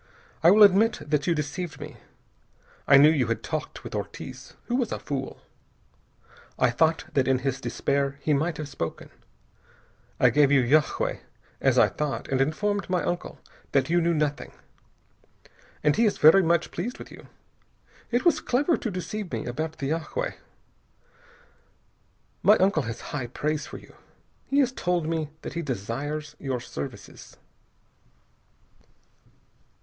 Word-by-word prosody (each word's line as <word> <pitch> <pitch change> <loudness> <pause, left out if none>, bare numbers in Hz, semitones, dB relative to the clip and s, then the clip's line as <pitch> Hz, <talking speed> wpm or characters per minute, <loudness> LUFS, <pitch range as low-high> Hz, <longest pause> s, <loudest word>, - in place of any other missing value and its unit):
I 165 - +7
will 210 +3 +7
admit 205 +3 +5
that 145 -1 0
you 170 - +3
deceived 150 +2 -4
me. - - -9 0.9
I 140 - +8
knew 150 +3 +7
you 135 -7 +1
had 115 - -2
talked - - -5
with - - -8
Ortiz, 130 0 -7
who - - -4
was 245 -4 0
a - - -2
fool. 135 -2 -5 1.1
I 125 -1 +3
thought 160 +6 +1
that 135 -3 +2
in 130 -1 +3
his 135 -1 -1
despair 140 0 -1
he 150 - 0
might 155 +3 0
have 155 - -5
spoken. 85 - -6 1.1
I - - +5
gave 145 -1 +4
you 135 -3 +5
yagué, 150 +5 +1 0.4
as - - +3
I - - +6
thought, 150 -2 -4
and 135 0 +1
informed 200 +9 -1
my 180 -1 +1
uncle 175 - -4 0.3
that 135 +2 +2
you 175 0 +3
knew 170 0 +1
nothing. 150 -1 -2 1.3
And 150 -1 +3
he 230 - +3
is 205 - -1
very 160 +6 +7
much 170 -1 +1
pleased 225 +9 -4
with - - -11
you. - - -13 0.8
It 245 +5 0
was 345 - +4
clever 285 +6 +1
to 235 - -3
deceive 185 +1 -5
me - - -3
about 155 +6 -4
the 140 +1 -3
yagué. 165 - -2 2.1
My 210 - +6
uncle 190 -4 +2
has 115 -3 -6
high 130 -4 -3
praise 150 +5 -2
for - - -8
you. - - -16 0.5
He 275 - 0
has 260 -2 +1
told 180 -9 -1
me 160 -2 -2
that - - -6
he 170 - -3
desires 145 +4 -4
your 130 -3 -3
services." 70 -12 -9
155 Hz, 155 wpm, -26 LUFS, 140-180 Hz, 2.1 s, I